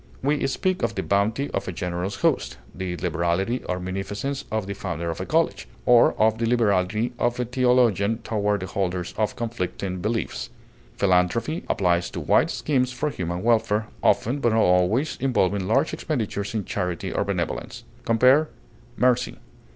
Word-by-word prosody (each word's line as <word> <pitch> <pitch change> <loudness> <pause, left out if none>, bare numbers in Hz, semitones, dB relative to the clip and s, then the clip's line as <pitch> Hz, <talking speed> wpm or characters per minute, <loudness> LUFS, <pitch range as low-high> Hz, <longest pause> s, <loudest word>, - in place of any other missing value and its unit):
We 145 +1 +1
speak 185 +7 -1
of 115 -2 -1
the 95 - -2
bounty 110 +8 0
of - - -3
a - - -2
generous 90 +2 -3
host, - - 0 0.2
the 90 -2 -4
liberality 90 +7 -1
or 90 0 -2
munificence 100 +9 -4
of 110 -2 -1
the 100 - -4
founder 85 -4 -3
of 80 - -5
a 95 - -5
college, 165 +1 +1 0.2
or 120 -1 +6
of 110 +1 +3
the 115 - +1
liberality 110 -1 +1
of 120 0 0
a 125 - 0
theologian 120 -4 +2
toward 105 -3 0
the - - -3
holders 90 -2 -2
of 105 -1 -1
conflicting 100 -5 -3
beliefs. 110 +3 -2 0.5
Philanthropy 100 - +1
applies 90 -2 +1
to - - -6
wide - - +3
schemes 130 -4 0
for 145 +4 -2
human 90 -5 -4
welfare, 110 -2 +2
often, 130 +6 +2
but 120 -4 +2
not 110 - +4
always, 90 +11 +2
involving 100 -7 +1
large 135 +8 +2
expenditures 110 -7 -3
in 105 - -1
charity 90 -4 -3
or - - +1
benevolence. - - -3 0.2
Compare 130 +7 +4 0.5
MERCY. 125 0 +2
110 Hz, 160 wpm, -24 LUFS, 95-125 Hz, 0.5 s, or